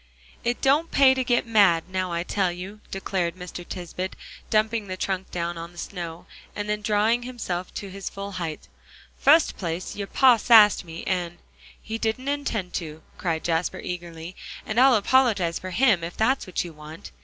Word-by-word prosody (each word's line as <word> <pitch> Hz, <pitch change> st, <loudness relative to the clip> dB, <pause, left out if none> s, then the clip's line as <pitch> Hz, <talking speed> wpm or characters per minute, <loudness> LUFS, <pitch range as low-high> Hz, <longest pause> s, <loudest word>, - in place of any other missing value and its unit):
"It 240 Hz, +1 st, -1 dB
don't 290 Hz, +5 st, +3 dB
pay 270 Hz, -1 st, +6 dB
to 260 Hz, 0 st, -1 dB
get 240 Hz, -1 st, +1 dB
mad, 200 Hz, -8 st, +4 dB
now 185 Hz, -1 st, -2 dB
I 170 Hz, 0 st, -1 dB
tell 185 Hz, -1 st, 0 dB
you," 185 Hz, +4 st, -8 dB
declared 185 Hz, -3 st, -2 dB
Mr. 180 Hz, -1 st, -8 dB
Tisbett, 180 Hz, +1 st, -5 dB, 0.3 s
dumping 215 Hz, 0 st, +1 dB
the 185 Hz, 0 st, -5 dB
trunk 190 Hz, 0 st, -2 dB
down 170 Hz, -1 st, -3 dB
on 170 Hz, +1 st, -8 dB
the -, -, -18 dB
snow, 170 Hz, -2 st, -6 dB, 0.3 s
and 205 Hz, 0 st, -3 dB
then 210 Hz, 0 st, -1 dB
drawing 215 Hz, +3 st, +2 dB
himself 220 Hz, -8 st, -4 dB
to 200 Hz, -, -5 dB
his 195 Hz, 0 st, -5 dB
full 200 Hz, 0 st, -7 dB
height; 170 Hz, -5 st, -5 dB, 0.5 s
"fust 310 Hz, +3 st, +5 dB
place, 170 Hz, -1 st, -4 dB
your 200 Hz, -1 st, -4 dB
pa 255 Hz, 0 st, +5 dB
sassed 215 Hz, -3 st, +6 dB
me, 165 Hz, -1 st, -8 dB
and" 175 Hz, -2 st, -2 dB, 0.4 s
"He 225 Hz, +1 st, -5 dB
didn't 230 Hz, +5 st, -1 dB
intend 230 Hz, -11 st, -2 dB
to," 160 Hz, -2 st, -5 dB, 0.2 s
cried 165 Hz, -3 st, -1 dB
Jasper 165 Hz, +1 st, 0 dB
eagerly, 170 Hz, 0 st, -7 dB, 0.3 s
"and 215 Hz, +2 st, 0 dB
I'll 260 Hz, -1 st, +7 dB
apologize 210 Hz, -7 st, +2 dB
for 185 Hz, -, -6 dB
him, 205 Hz, -3 st, +3 dB
if 170 Hz, +1 st, -6 dB
that's 255 Hz, +3 st, +1 dB
what 185 Hz, -, -1 dB
you 170 Hz, -2 st, -9 dB
want." 155 Hz, +5 st, -11 dB
190 Hz, 180 wpm, -25 LUFS, 175-225 Hz, 0.5 s, I'll